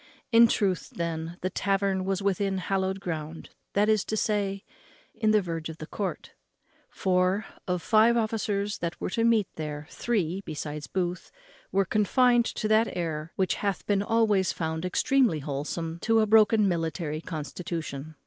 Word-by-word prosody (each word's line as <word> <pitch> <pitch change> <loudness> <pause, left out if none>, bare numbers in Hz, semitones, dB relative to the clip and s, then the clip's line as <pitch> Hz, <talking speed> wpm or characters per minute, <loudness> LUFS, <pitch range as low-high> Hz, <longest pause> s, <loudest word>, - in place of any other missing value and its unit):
In 230 0 +8
truth, 195 -5 0
then, 165 0 -3
the 185 - -2
tavern 195 0 0
was 195 0 -1
within 195 0 0
hallowed 190 +1 -1
ground, 160 -3 -5 0.2
that 205 +1 +3
is 215 -2 +3
to 220 - -2
say, 200 -2 -1 0.5
in 220 - 0
the 215 -2 +4
verge 165 -2 -4
of 160 - -8
the 155 - -7
court; 190 +1 -4 0.6
for, 185 +2 +1 0.2
of 180 -2 -1
five 230 +1 +4
officers 210 -2 -1
that 170 0 -4
were - - -3
to 230 +2 0
meet 225 -4 +3
there, 150 -1 -5
three, 195 -6 -1
besides 150 -3 -5
Booth, 180 +1 -3 0.4
were 195 0 +2
confined 240 +4 +3
to 215 - -2
that 220 +2 +4
air 160 -1 -3
which 190 -1 +1
hath 200 -2 -1
been 200 -1 +2
always 210 -3 +2
found 160 +1 -3
extremely 240 - +2
wholesome 150 +3 -4
to 225 +4 +3
a 215 - +4
broken 215 -1 +5
military 160 -3 -2
constitution. 155 -2 -5
190 Hz, 160 wpm, -27 LUFS, 165-215 Hz, 0.6 s, In